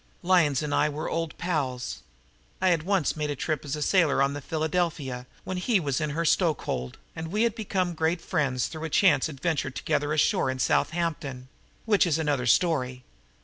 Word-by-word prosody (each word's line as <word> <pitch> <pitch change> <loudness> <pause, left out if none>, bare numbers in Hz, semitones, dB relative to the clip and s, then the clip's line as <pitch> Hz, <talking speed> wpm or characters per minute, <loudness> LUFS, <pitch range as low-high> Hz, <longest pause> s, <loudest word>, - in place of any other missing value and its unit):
Lyons 165 -7 +3
and 145 -1 -2
I 150 - +3
were 150 +1 -4
old 165 -1 -3
pals. 140 -8 -2 0.6
I 185 - +3
had 170 -3 +2
once 185 -2 +1
made 150 -1 -2
a 145 - -2
trip 155 +3 -2
as 145 0 -3
sailor 170 -8 +3
on 140 0 +1
the 145 - -5
Philadelphia 155 -5 -2 0.2
when 185 - -4
he 200 +3 +2
was 140 -3 -1
in 155 - -1
her 165 +3 -2
stokehold, 150 - 0 0.2
and 160 0 -5
we 210 +7 0
had 235 -2 +2
become 190 -5 -1
great 160 +2 0
friends 140 -8 0
through 160 0 -6
a - - -3
chance 155 -4 +4
adventure 145 -1 -1
together 145 +3 -1
ashore 155 - +2
in 130 - -2
Southampton 145 -3 -1 0.4
which 205 -4 +4
is 160 -2 +2
another 145 -6 0
story. 130 -5 +2
155 Hz, 185 wpm, -27 LUFS, 140-175 Hz, 0.6 s, chance